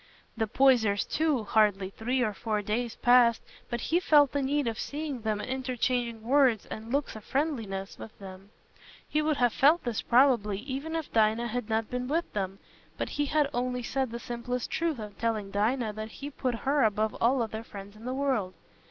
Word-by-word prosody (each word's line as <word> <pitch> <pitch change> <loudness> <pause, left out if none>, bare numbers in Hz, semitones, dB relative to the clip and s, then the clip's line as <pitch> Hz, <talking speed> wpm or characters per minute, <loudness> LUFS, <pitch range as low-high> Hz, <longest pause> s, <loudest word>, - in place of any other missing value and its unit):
The 225 -1 -1
Poysers, 220 -5 +3
too—hardly 215 -10 +1
three 245 +5 -1
or 215 -3 0
four 210 0 -2
days 230 +3 -2
passed 240 -2 +4 0.3
but 240 -1 -2
he 340 - +1
felt 295 -6 +5
the 285 - 0
need 285 +1 0
of 225 -2 -2
seeing 290 -4 -4
them 215 -1 -1
and - - -5
interchanging 250 -3 -1
words 255 -3 +3
and 220 +2 -8
looks 280 -2 -1
of 220 - -9
friendliness 225 -10 -2
with 220 - -10
them. 190 0 -11 0.6
He 305 - +1
would 305 -1 +1
have 245 -2 +2
felt 305 +6 +4
this, 240 -4 -2
probably, 235 -5 +3
even 275 +5 -4
if 320 -3 -4
Dinah 225 +2 +2
had 240 -1 -3
not 220 0 -1
been 250 0 -2
with 330 +5 -1
them, 195 -2 -3 0.4
but - - -2
he 290 - -1
had 300 0 +2
only 250 0 -1
said 265 +1 -1
the 235 - -5
simplest 240 +1 -4
truth 330 -3 0
in 210 -2 -7
telling 220 -3 -1
Dinah 220 +2 0
that 215 +1 -7
he 285 +1 -7
put 255 -3 -2
her 280 +1 +3
above 215 0 +1
all 245 +1 +3
other 220 0 -5
friends 200 -2 -10
in 220 +2 -13
the 255 - -2
world. 255 -10 -1
240 Hz, 195 wpm, -29 LUFS, 215-270 Hz, 0.6 s, felt